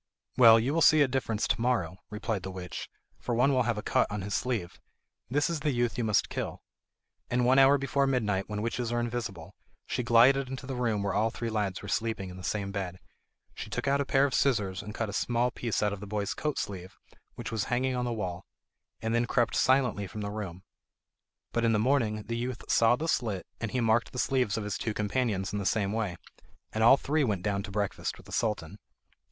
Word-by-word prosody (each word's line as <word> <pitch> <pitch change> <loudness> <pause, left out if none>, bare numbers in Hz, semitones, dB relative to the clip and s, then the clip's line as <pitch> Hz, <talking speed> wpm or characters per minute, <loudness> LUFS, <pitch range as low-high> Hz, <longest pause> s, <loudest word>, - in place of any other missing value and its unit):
"Well, 115 -2 +8
you 125 +6 0
will 165 - +1
see 155 0 +7
a - - +2
difference 125 -5 -1
to - - 0
morrow," 110 -9 0
replied 105 -1 -3
the 95 - -6
witch, 90 -2 -6 0.3
"for 120 - -2
one 135 +4 +3
will 130 - +3
have 115 - 0
a 105 - -4
cut - - +2
on 105 -2 -4
his 100 +1 -4
sleeve. 105 -9 -2 0.5
That 145 +3 +2
is 170 -2 -2
the 150 0 0
youth 120 -3 0
you 120 - -1
must 105 -2 +2
kill." - - -5 0.7
And 125 0 +1
one 130 +2 +5
hour 135 +1 +7
before 140 0 +1
midnight, 105 -7 0
when 105 0 -3
witches 115 +1 -2
are 120 - 0
invisible, 115 -8 -4 0.3
she - - -2
glided 125 +3 +5
into 135 0 -6
the 135 - -4
room 115 -5 0
where 100 -1 -1
all 110 +2 +2
three 115 0 -4
lads 105 -4 -2
were - - -7
sleeping 105 -2 -2
in 90 - -10
the 90 - -10
same 100 +1 -2
bed. 95 -3 -4 0.6
She - - -7
took - - -3
out 140 +1 +3
a - - +2
pair 135 +1 +3
of 140 - -2
scissors 105 -8 +1
and 105 +1 -8
cut 110 - -1
a 100 - -6
small 120 +3 +1
piece 115 -3 -2
out 105 -1 +1
of 100 - -6
the 105 - -8
boy's 100 0 -2
coat 150 -2 -2
sleeve 95 -2 -5 0.4
which - - -6
was 110 -2 -1
hanging 130 +1 0
on 125 0 -1
the 120 - -1
wall, 95 -5 -4 0.6
and 110 0 0
then 120 0 +2
crept 120 -2 +1
silently 125 -6 +2
from 105 - -7
the 100 0 -3
room. 95 -4 -6 0.9
But 115 - 0
in 115 -1 +3
the - - +3
morning 110 -3 +1
the 115 +3 -4
youth 125 0 -4
saw 115 +1 +5
the 160 +5 -4
slit, 110 - -1
and 115 - -3
he 125 - -1
marked 115 +1 +2
the - - -6
sleeves 125 -3 +1
of 110 - -2
his 105 -1 -3
two 110 -2 -2
companions 105 -3 -1
in 105 - -1
the - - -3
same 100 0 +1
way, 105 -5 -1 0.6
and 110 - 0
all 125 +4 +8
three 150 +2 0
went 100 -8 -1
down 100 -2 0
to 100 - -7
breakfast 100 -1 -2
with - - -16
the - - -13
Sultan. 105 -4 -2
115 Hz, 235 wpm, -29 LUFS, 100-125 Hz, 0.9 s, Well